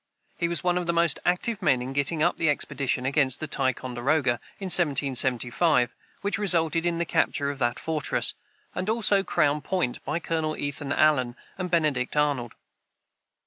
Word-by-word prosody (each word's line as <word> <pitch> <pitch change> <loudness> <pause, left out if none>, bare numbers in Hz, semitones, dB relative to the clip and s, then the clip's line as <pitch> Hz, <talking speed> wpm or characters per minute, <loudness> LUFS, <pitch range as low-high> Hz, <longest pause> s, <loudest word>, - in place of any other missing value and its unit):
He 170 - -1
was 170 +1 -2
one 180 0 +2
of 175 - -5
the 170 - +1
most 170 -3 +3
active 200 +5 0
men 140 -8 +3
in 130 +2 -5
getting 145 +3 0
up - - +2
the 160 - +2
expedition 140 -3 -1
against 135 -1 +2
Ticonderoga, 130 -2 0 0.2
in 195 - -7
1775, 135 -2 +2 0.3
which 200 +1 -1
resulted 170 -4 +2
in 170 -1 0
the 170 - -1
capture 140 -3 0
of 140 - -9
that 120 -2 0
fortress, 155 -3 -1 0.4
and 185 - -3
also 210 -3 +3
Crown 150 -5 +1
Point, 165 -6 -2
by 155 - -2
Colonel 160 -2 -2
Ethan 145 0 -4
Allen 130 -6 +2 0.2
and 185 -1 -4
Benedict 150 -6 0
Arnold. 140 -6 0
150 Hz, 160 wpm, -26 LUFS, 130-170 Hz, 0.4 s, most